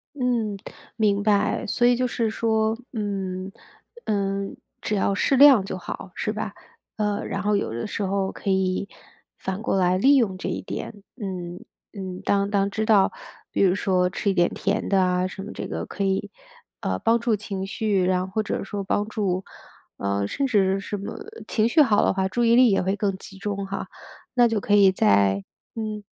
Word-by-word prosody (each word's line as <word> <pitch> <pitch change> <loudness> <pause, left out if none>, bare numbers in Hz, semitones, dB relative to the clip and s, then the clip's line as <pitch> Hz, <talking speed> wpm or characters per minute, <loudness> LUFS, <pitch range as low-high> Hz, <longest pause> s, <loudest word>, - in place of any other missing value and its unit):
嗯， 240 -6 0 0.4
明 205 -2 +2
白。 210 -1 +2
所 240 +4 +1
以 245 0 +5
就 250 +1 0
是 230 -2 -1
说， 220 0 +1 0.2
嗯， 195 -3 -3 0.5
呃， 195 -1 0 0.4
只 210 - -1
要 200 - +1
适 265 +7 +2
量 275 -7 +8
就 190 - -4
好， 185 +1 -7
是 215 - -2
吧？ 210 -1 -4 0.4
呃， 210 -1 -1
然 195 - -3
后 210 0 +2
有 200 - -1
的 115 - -3
时 210 - -4
候 195 0 0
可 200 - -5
以， 190 +1 0 0.5
反 190 +2 -4
过 210 - 0
来 180 0 +3
利 275 +8 +5
用 210 -8 +2
这 185 - -4
一 180 - -3
点。 205 +1 -7 0.2
嗯， 180 -3 -5 0.3
嗯， 190 -3 -6
当 200 0 +1
当 200 -1 +1
知 220 +1 -1
道 205 -4 +4 0.4
比 - - 0
如 185 -1 +4
说 185 -2 +1
吃 195 +2 -2
一 - - -1
点 175 -1 +3
甜 200 +2 -1
的 195 -1 +4
啊 180 0 +1
什 195 +1 -8
么 205 - -7
这 - - -5
个 - - -4
可 200 - -4
以， 195 0 -1 0.5
呃， - - -1
帮 230 +1 +3
助 230 -2 +1
情 195 -2 -5
绪， 200 -1 0
然 180 0 +2
后 190 - -11
或 220 - +1
者 215 - -3
说 200 0 -4
帮 205 +2 0
助 195 -4 -1 0.5
呃， 100 0 -1
甚 275 - -1
至 195 -4 +2
什 205 +1 -4
么， 200 - -6 0.3
情 220 0 +2
绪 310 +6 +5
好 210 -5 +3
的 - - +3
话， 190 0 0
注 240 +5 -1
意 230 0 +5
力 245 -3 +6
也 195 - +2
会 190 +2 0
更 200 -1 -1
集 195 0 -11
中 200 0 -3
哈， 195 - -4 0.5
那 245 -2 +5
就 225 -2 0
可 205 - -1
以 200 -2 +7
在 100 - +3 0.3
嗯。 215 -2 -4
200 Hz, 215 characters per minute, -24 LUFS, 190-215 Hz, 0.5 s, 量